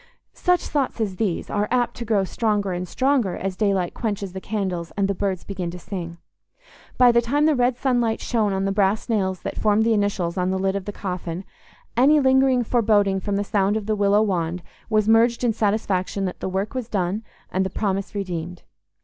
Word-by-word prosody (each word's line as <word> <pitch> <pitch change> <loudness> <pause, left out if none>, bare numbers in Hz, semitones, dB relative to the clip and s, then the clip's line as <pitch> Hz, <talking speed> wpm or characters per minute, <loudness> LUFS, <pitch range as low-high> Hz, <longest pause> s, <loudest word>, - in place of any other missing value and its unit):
Such 360 -1 +2
thoughts 275 -4 -2
as 200 -4 -2
these 195 -5 -1
are 205 0 0
apt 245 -1 +1
to 235 - -5
grow 210 -3 +2
stronger 205 -1 0
and 180 0 -3
stronger 255 -5 +1
as 195 -1 -3
daylight 195 -4 0
quenches 205 -4 -3
the 190 - -6
candles 185 -6 -3
and 200 -1 +2
the 200 - 0
birds 190 -1 -2
begin 185 -3 -4
to 175 - -7
sing. 170 -2 -6 0.8
By 250 -1 +7
the 235 0 +4
time 285 +6 +1
the 315 - +4
red 245 -2 +1
sunlight 245 -4 +1
shone 220 -4 0
on 195 0 -1
the 195 - 0
brass 200 +3 +1
nails 190 -5 0
that - - -5
formed 215 0 +3
the 230 0 +3
initials 200 -4 0
on 180 0 +1
the 190 - 0
lid 190 +1 0
of 200 -2 -3
the 205 - -4
coffin, 180 -3 -5 0.5
any 280 +5 +5
lingering 265 -2 +4
foreboding 210 -4 +2
from 200 +1 -2
the 200 - 0
sound 200 0 +1
of 215 - -5
the 215 0 0
willow 205 +1 +3
wand 175 -3 -1 0.3
was 215 -1 +2
merged 230 +2 +4
in 235 -2 +2
satisfaction 200 -3 0
that 180 - -4
the - - -3
work 190 +3 -2
was 255 -3 -4
done 190 +1 -1 0.3
and 190 - +1
the 190 - -2
promise 195 0 -2
redeemed. 180 -3 -4
205 Hz, 210 wpm, -23 LUFS, 190-230 Hz, 0.8 s, By